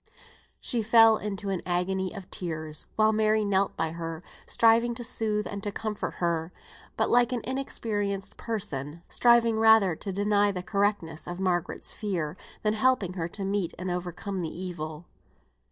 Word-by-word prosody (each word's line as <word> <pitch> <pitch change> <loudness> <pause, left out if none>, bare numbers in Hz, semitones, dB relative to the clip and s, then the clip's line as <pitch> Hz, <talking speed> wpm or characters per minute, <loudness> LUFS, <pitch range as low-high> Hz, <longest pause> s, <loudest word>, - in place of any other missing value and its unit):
She 235 - -1
fell 225 0 +6
into 205 -1 -4
an 190 -3 -1
agony 185 +1 -1
of 195 -3 -9
tears, 155 -3 -5
while 215 0 +4
Mary 215 0 +2
knelt 200 -1 +1
by 160 - -1
her, 165 0 -5 0.2
striving 230 +1 +4
to 240 - -6
soothe 215 -2 -1
and 200 -1 -5
to 205 - -3
comfort 215 0 -4
her; 170 -1 -1 0.5
but, - - +1
like 245 0 +4
an 245 -2 -1
inexperienced 205 -7 -2
person, 165 - -4
striving 235 -2 +4
rather 220 -6 +6
to 195 - -5
deny 205 +1 +2
the 180 -2 -5
correctness 200 -5 -1
of 175 +1 -5
Margaret's 180 -2 -1
fear, 175 -7 -3 0.3
than 215 0 +2
helping 220 -5 +2
her 170 -3 -2
to 195 +3 -6
meet 195 -3 -1
and 185 0 -3
overcome 180 +2 -4
the 165 - -2
evil. 165 -3 -6
200 Hz, 160 wpm, -28 LUFS, 175-220 Hz, 0.5 s, fell